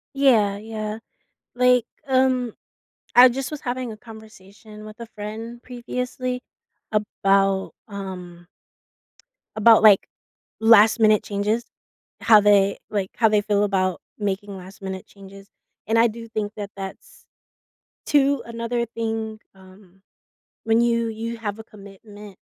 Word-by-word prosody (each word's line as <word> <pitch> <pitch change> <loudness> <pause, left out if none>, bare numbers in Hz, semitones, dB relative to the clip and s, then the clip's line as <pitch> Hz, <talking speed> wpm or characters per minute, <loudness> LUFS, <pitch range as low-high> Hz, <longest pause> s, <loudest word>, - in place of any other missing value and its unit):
Yeah, 225 -8 +3
yeah. 215 0 -6 0.6
Like, 250 -1 +4 0.2
um, 255 -3 +1 0.6
I 250 +1 +9
just 265 +2 -4
was 300 -2 -6
having 245 -1 -4
a - - -10
conversation 215 -1 -14
with 215 +2 -12
a 235 - -7
friend 225 +3 -7
previously 250 0 -5 0.5
about, 195 -2 +1 0.2
um 180 -4 -8 1.1
about, 220 +1 +6
like, 210 -3 +6 0.5
last 225 0 +6
minute 215 -1 +4
changes, 210 +3 -1 0.6
how 220 -2 +7
they, 200 -1 +3
like, 200 -3 -2
how 225 - +4
they 210 -1 +3
feel 205 0 +1
about 185 -3 0 0.2
making 205 -1 -3
last 185 +2 -13
minute 190 -1 -6
changes, 195 0 -14 0.4
and 225 +1 +2
I 235 - +5
do 230 +1 -8
think 215 -1 -4
that 205 -1 -6
that's, 195 -1 -10 0.8
too, 280 -2 +2
another 235 +1 -3
thing, 225 -1 -4 0.2
um, 190 0 -19 0.6
when 225 +1 +3
you 235 -1 +1
you 225 +1 -5
have 210 -2 -5
a 220 - -9
commitment, 205 -1 -14
215 Hz, 130 wpm, -23 LUFS, 200-235 Hz, 1.1 s, I